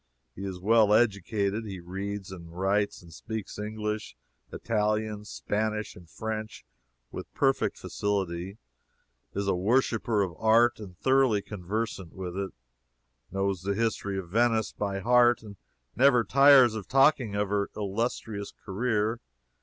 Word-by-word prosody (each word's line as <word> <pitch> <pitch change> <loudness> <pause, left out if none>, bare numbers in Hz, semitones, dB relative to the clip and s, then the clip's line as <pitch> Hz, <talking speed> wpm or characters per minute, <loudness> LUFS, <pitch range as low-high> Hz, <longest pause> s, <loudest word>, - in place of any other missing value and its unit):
He 95 - -7
is 95 -2 -5
well 105 +1 +4
educated. 105 -1 +1
He 95 -2 -6
reads, 95 +2 -5
writes, 95 +4 -1
and 85 -1 -14
speaks 110 -2 -6
English, 105 0 -4 0.4
Italian, 105 -1 -1
Spanish, 110 0 -3
and 85 -2 -15
French, 110 +2 -5 0.5
with - - -8
perfect 135 -1 +1
facility; 95 -2 -3 0.8
is 100 0 -1
a - - +3
worshipper 110 +2 +1
of 90 -3 -4
art 115 +2 +4
and 95 -5 -10
thoroughly 130 -5 +3
conversant 100 -1 -4
with 90 -2 -6
it; 100 0 -2 0.8
knows 95 -1 -1
the 100 +2 -1
history 100 -3 -1
of 90 -3 -5
Venice 115 +1 +2
by 100 -1 -3
heart 120 +1 +4
and 105 -2 -10 0.4
never 125 -2 +5
tires 135 -2 +6
of 110 -3 -6
talking 135 -5 +3
of 100 -1 0
her 100 0 0
illustrious 105 0 -3
career. 110 +2 0
105 Hz, 130 wpm, -28 LUFS, 95-115 Hz, 0.8 s, tires